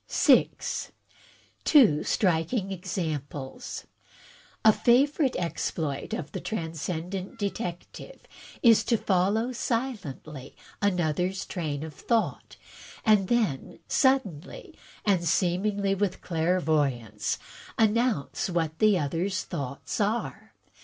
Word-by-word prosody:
6, -, -, +2 dB, 0.7 s
Two 215 Hz, -, +6 dB
Striking 185 Hz, +3 st, +1 dB
Examples 150 Hz, -7 st, -5 dB, 0.8 s
A 220 Hz, -, +8 dB
favorite 270 Hz, +4 st, +3 dB
exploit 160 Hz, -4 st, -3 dB
of 155 Hz, -2 st, -4 dB
the -, -, -4 dB
Transcendent 175 Hz, +2 st, -4 dB
Detective, 200 Hz, -, -5 dB, 0.4 s
is 230 Hz, -3 st, +6 dB
to 230 Hz, -, +2 dB
follow 205 Hz, +6 st, +1 dB
silently 205 Hz, -, -4 dB, 0.3 s
another's 180 Hz, -1 st, 0 dB
train 155 Hz, -5 st, -3 dB
of 160 Hz, -1 st, -7 dB
thought; 230 Hz, +7 st, -1 dB, 0.5 s
and 210 Hz, -4 st, +4 dB
then 215 Hz, -, 0 dB
suddenly 265 Hz, -, 0 dB, 0.3 s
and 190 Hz, -4 st, +3 dB
seemingly 195 Hz, +4 st, +1 dB
with 195 Hz, -1 st, -1 dB
clairvoyance, 150 Hz, -, 0 dB, 0.4 s
announce 220 Hz, -, +1 dB
what 160 Hz, -3 st, -1 dB
the 215 Hz, -3 st, +5 dB
other's 175 Hz, +5 st, -1 dB
thoughts 140 Hz, -6 st, -5 dB
are. 215 Hz, +4 st, -2 dB
185 Hz, 90 wpm, -27 LUFS, 155-220 Hz, 0.8 s, A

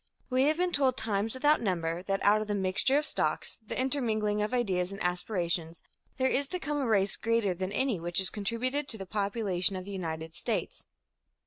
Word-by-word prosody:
We 255 Hz, +1 st, +3 dB
have 305 Hz, +2 st, +2 dB
been 360 Hz, 0 st, +1 dB
told 270 Hz, -5 st, +2 dB
times 215 Hz, +1 st, 0 dB
without 295 Hz, +3 st, +3 dB
number 170 Hz, -5 st, -1 dB
that 195 Hz, +1 st, -2 dB
out 210 Hz, +1 st, +5 dB
of 215 Hz, -, -4 dB
the 205 Hz, -, -1 dB
mixture 195 Hz, +8 st, +3 dB
of 300 Hz, -, +1 dB
stocks, -, -, 0 dB
the 220 Hz, -, -4 dB
intermingling 220 Hz, -6 st, +1 dB
of 210 Hz, -, -1 dB
ideas 195 Hz, -7 st, 0 dB
and 195 Hz, -, -7 dB
aspirations, 175 Hz, -2 st, -1 dB, 0.3 s
there 260 Hz, 0 st, +2 dB
is 275 Hz, +2 st, +2 dB
to 365 Hz, +5 st, -2 dB
come 295 Hz, -3 st, -2 dB
a 265 Hz, -, 0 dB
race 200 Hz, -3 st, +2 dB
greater 230 Hz, -4 st, +1 dB
than 185 Hz, +2 st, -4 dB
any 245 Hz, -3 st, 0 dB
which 175 Hz, +1 st, -3 dB
has 190 Hz, -1 st, +4 dB
contributed 250 Hz, +7 st, -2 dB
to 225 Hz, -, -4 dB
the 195 Hz, -, -6 dB
population 200 Hz, -2 st, 0 dB
of 185 Hz, 0 st, -5 dB
the 200 Hz, -, -7 dB
United 160 Hz, -4 st, -4 dB
States. -, -, -3 dB
210 Hz, 205 wpm, -30 LUFS, 185-255 Hz, 0.3 s, out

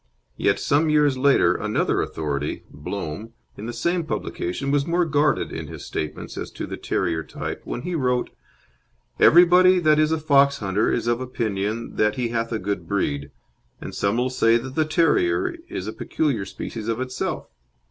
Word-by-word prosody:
Yet -, -, +1 dB
some 155 Hz, +3 st, +2 dB
years 150 Hz, -2 st, +3 dB
later 130 Hz, -10 st, +4 dB
another 105 Hz, +3 st, 0 dB
authority 75 Hz, -2 st, -3 dB
Blome 105 Hz, +10 st, -6 dB, 0.2 s
in 105 Hz, -, -7 dB
the -, -, -3 dB
same 170 Hz, +9 st, 0 dB
publication 140 Hz, -, -3 dB
was 145 Hz, +1 st, +1 dB
more 175 Hz, +1 st, +2 dB
guarded 150 Hz, -1 st, +1 dB
in -, -, -5 dB
his -, -, -9 dB
statements 75 Hz, -, -5 dB
as -, -, -5 dB
to -, -, -5 dB
the -, -, -6 dB
terrier 85 Hz, -3 st, -1 dB
type -, -, -6 dB
when 120 Hz, -, -5 dB
he 180 Hz, -, -3 dB
wrote: 125 Hz, -5 st, 0 dB, 0.9 s
"Everybody 180 Hz, +2 st, +7 dB
that 155 Hz, -3 st, +4 dB
is 155 Hz, 0 st, +3 dB
a 160 Hz, -, +2 dB
fox 140 Hz, -2 st, +4 dB
hunter 100 Hz, +1 st, 0 dB
is 115 Hz, -, -1 dB
of 120 Hz, +1 st, 0 dB
opinion 110 Hz, -3 st, -3 dB
that 105 Hz, 0 st, +2 dB
he 125 Hz, -3 st, -1 dB
hath 115 Hz, 0 st, -2 dB
a 115 Hz, -, 0 dB
good 95 Hz, -4 st, -3 dB
breed, 70 Hz, -8 st, -1 dB, 0.5 s
and -, -, -7 dB
some 100 Hz, +3 st, 0 dB
will 125 Hz, +1 st, 0 dB
say 115 Hz, -2 st, +4 dB
that 130 Hz, +2 st, -6 dB
the 155 Hz, +1 st, +1 dB
terrier 355 Hz, -, +2 dB
is -, -, -4 dB
a -, -, -4 dB
peculiar 135 Hz, -11 st, -1 dB
species 110 Hz, +2 st, -6 dB
of 115 Hz, +1 st, -1 dB
itself. 130 Hz, 0 st, -3 dB
125 Hz, 180 wpm, -23 LUFS, 105-155 Hz, 0.9 s, Everybody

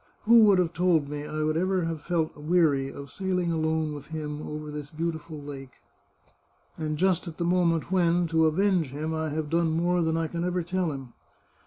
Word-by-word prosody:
Who 230 Hz, 0 st, +7 dB
would 200 Hz, -2 st, +5 dB
have 175 Hz, -2 st, +1 dB
told 165 Hz, -5 st, +2 dB
me 145 Hz, 0 st, -5 dB
I 155 Hz, 0 st, -3 dB
ever 175 Hz, +5 st, +1 dB
could 165 Hz, -, -1 dB
have 165 Hz, -2 st, -4 dB
felt 165 Hz, -1 st, -1 dB
weary 150 Hz, -3 st, +2 dB
of 140 Hz, -1 st, -9 dB
sailing 180 Hz, -2 st, -1 dB
alone 160 Hz, -1 st, 0 dB
with 145 Hz, -1 st, -9 dB
him 150 Hz, -1 st, -5 dB
over 150 Hz, 0 st, -6 dB
this 150 Hz, -1 st, -6 dB
beautiful 160 Hz, -1 st, -4 dB
lake! 135 Hz, -3 st, -9 dB, 1.0 s
And 155 Hz, -1 st, -3 dB
just 185 Hz, +1 st, +1 dB
at 165 Hz, -, -7 dB
the 170 Hz, -, -1 dB
moment 170 Hz, -1 st, +1 dB
when, 175 Hz, -1 st, +3 dB
to 160 Hz, 0 st, +4 dB
avenge 180 Hz, 0 st, +2 dB
him, 150 Hz, +4 st, -4 dB
I 160 Hz, 0 st, -2 dB
have 150 Hz, 0 st, -3 dB
done 165 Hz, 0 st, +2 dB
more 175 Hz, +2 st, +1 dB
than 160 Hz, 0 st, +1 dB
I 165 Hz, -, 0 dB
can 170 Hz, +2 st, -4 dB
ever 180 Hz, 0 st, -1 dB
tell 180 Hz, -1 st, -1 dB
him 135 Hz, -4 st, -8 dB
160 Hz, 200 wpm, -27 LUFS, 150-175 Hz, 1.0 s, Who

